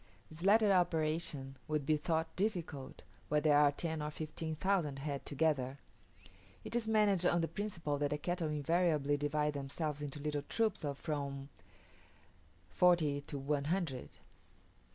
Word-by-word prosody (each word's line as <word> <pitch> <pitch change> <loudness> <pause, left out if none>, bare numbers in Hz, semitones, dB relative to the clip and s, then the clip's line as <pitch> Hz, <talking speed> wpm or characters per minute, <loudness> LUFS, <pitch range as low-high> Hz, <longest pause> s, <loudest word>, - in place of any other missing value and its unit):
This 155 +1 -8
latter 210 +1 +5
operation 155 -6 0
would 150 -2 -1
be 155 - +3
thought 160 +1 -1
difficult, 175 -9 -3 0.3
where 150 - +3
there 150 -1 +5
are 145 -1 +6
ten 160 +1 -3
or 150 - -2
fifteen 155 +1 -5
thousand 165 -5 0
head 140 0 -4
together. 140 -3 0 0.9
It - - -6
is 235 -2 0
managed 205 -5 +3
on 175 -1 +3
the 165 - 0
principle 165 -6 -3
that 145 -1 +1
the 150 - -1
cattle 175 +1 -2
invariably 150 -1 +2
divide 150 +1 0
themselves 145 +2 -3
into 145 0 -5
little 150 0 -2
troops 215 +5 0
of 140 -2 -2
from 140 -2 -4 1.2
forty 160 -6 +3
to 145 - -4
one 140 +1 -1
hundred. 160 -6 -2
150 Hz, 150 wpm, -35 LUFS, 145-175 Hz, 1.2 s, are